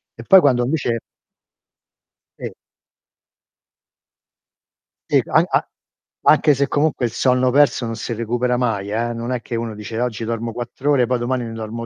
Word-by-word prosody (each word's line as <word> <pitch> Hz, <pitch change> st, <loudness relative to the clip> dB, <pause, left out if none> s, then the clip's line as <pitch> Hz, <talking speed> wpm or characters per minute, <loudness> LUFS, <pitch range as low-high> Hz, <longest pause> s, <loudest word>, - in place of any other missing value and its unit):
e 115 Hz, -, -10 dB
poi 190 Hz, +9 st, +7 dB
quando 125 Hz, -4 st, +3 dB
invece 120 Hz, -3 st, -1 dB, 1.4 s
E -, -, -6 dB, 2.6 s
E -, -, +4 dB
an -, -, +3 dB
a -, -, 0 dB, 0.6 s
anche 150 Hz, -2 st, +5 dB
se 140 Hz, +1 st, 0 dB
comunque 145 Hz, -4 st, 0 dB
il 115 Hz, -, -2 dB
sonno 125 Hz, +1 st, +2 dB
perso 145 Hz, -1 st, +3 dB
non 115 Hz, -1 st, -4 dB
si 120 Hz, -, -4 dB
recupera 120 Hz, +2 st, -1 dB
mai, 110 Hz, -5 st, -1 dB
eh, 115 Hz, +2 st, -1 dB
non 120 Hz, +2 st, -4 dB
è 125 Hz, -, -3 dB
che 115 Hz, -, -6 dB
uno 115 Hz, -1 st, -4 dB
dice: 105 Hz, +2 st, -6 dB
"oggi 120 Hz, -2 st, -2 dB
dormo 115 Hz, 0 st, -3 dB
4 120 Hz, +3 st, -6 dB
ore, 140 Hz, -4 st, +4 dB
poi 125 Hz, 0 st, -1 dB
domani 125 Hz, +1 st, -2 dB
ne 115 Hz, -, -6 dB
dormo 115 Hz, +1 st, -6 dB
120 Hz, 160 wpm, -20 LUFS, 115-130 Hz, 2.6 s, poi